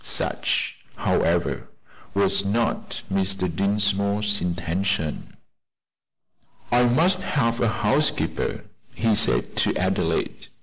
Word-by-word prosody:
Such, - - -1 0.2
however, 85 +1 0 0.5
was 100 0 +3
not 120 - -1
Mr. 95 -1 +1
Dinsmore's 100 +1 +1
intention. 85 -1 -2 1.3
"I 120 0 +5
must 170 +10 +3
have 115 -8 0
a 120 - +3
housekeeper," 145 +6 0 0.3
he 115 -1 +2
said - - +2
to - - +2
Adelaide. - - -1
100 Hz, 90 wpm, -24 LUFS, 95-120 Hz, 1.3 s, I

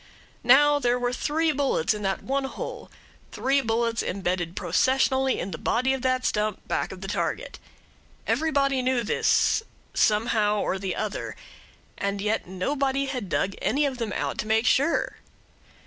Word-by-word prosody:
There 290 -4 +5
were 245 0 0
now - - -4
three 315 +5 +1
bullets 270 - +1
in 210 - -6
that 195 -1 -2
one 275 +1 -1
hole 270 - -6 0.4
three 275 +1 +1
bullets 230 -1 0
embedded 180 -2 -2
processionally 265 +8 +2
in 190 - -4
the 155 - -6
body 255 +3 +1
of 265 - -3
the 255 0 +2
stump 210 -4 -1
back - - -1
of 190 - -9
the 195 - -5
target. 205 - -3 0.7
Everybody 280 -4 +1
knew 255 -1 +1
this 230 - +2 0.3
somehow 210 -1 +2
or - - 0 0.2
other 215 -2 -3 0.6
and 200 0 -1
yet 210 0 -1
nobody 270 +9 -1
had 250 -8 -4
dug 195 - 0
any 285 +6 +2
of 265 -3 -3
them 225 -3 -2
out - - -3
to 215 - -2
make 220 +2 +2
sure. 285 +6 +2
245 Hz, 155 wpm, -26 LUFS, 210-270 Hz, 0.7 s, There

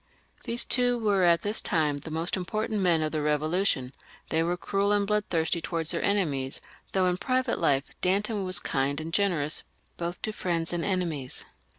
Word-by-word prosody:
These 235 +1 +1
two 245 -1 +3
were 205 -4 +2
at 170 -2 +4
this 205 +2 0
time 150 -4 +1
the 145 +3 -8
most 165 +3 -1
important 215 +3 -2
men 170 -4 +3
of 155 - -1
the 155 - -1
Eevolu 150 +5 +1
tion; 130 -5 0 0.4
they 160 - +2
were 175 +2 0
cruel 200 +3 0
and 205 -1 +3
bloodthirsty 180 -5 0
towards 165 -1 -2
their 170 - 0
enemies, 145 -10 0 0.3
though 190 -1 +3
in 180 0 +2
private 255 -1 0
life 135 0 +1
Danton 200 +3 +1
was 185 -1 +3
kind 140 +1 0
and 160 +1 -6
generous 170 -7 +1 0.4
both 175 +1 -3
to 215 - -2
friends 170 -4 -1
and 170 -1 -1
enemies. 170 -9 -2
175 Hz, 185 wpm, -28 LUFS, 155-200 Hz, 0.4 s, at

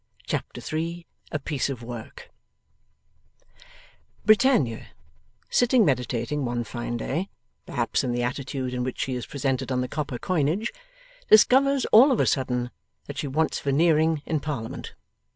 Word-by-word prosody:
Chapter - - -4
3 165 +2 -4 0.3
A - - 0
PIECE 145 -1 -2
OF 125 -4 -5
WORK 115 -2 -9 1.9
Britannia, 215 - +3 0.6
sitting 245 -2 +4
meditating 125 +1 -1
one 120 -1 -1
fine 120 +1 -4
day 165 - -3 0.4
(perhaps 120 -1 0
in 125 - -1
the 120 0 -1
attitude 130 0 -3
in 125 0 -1
which 130 0 -4
she 130 - -1
is 125 -1 -4
presented 135 -2 -2
on 125 -1 +1
the 125 - -2
copper 140 -3 -4
coinage), 175 - 0 0.6
discovers 270 +5 +5
all 255 +6 +8
of 250 - +1
a - - +4
sudden 125 -2 0 0.3
that - - -7
she - - -2
wants 155 +4 0
Veneering 155 +1 +2
in 160 -2 0
Parliament. 135 -7 -5
140 Hz, 140 wpm, -25 LUFS, 125-165 Hz, 1.9 s, all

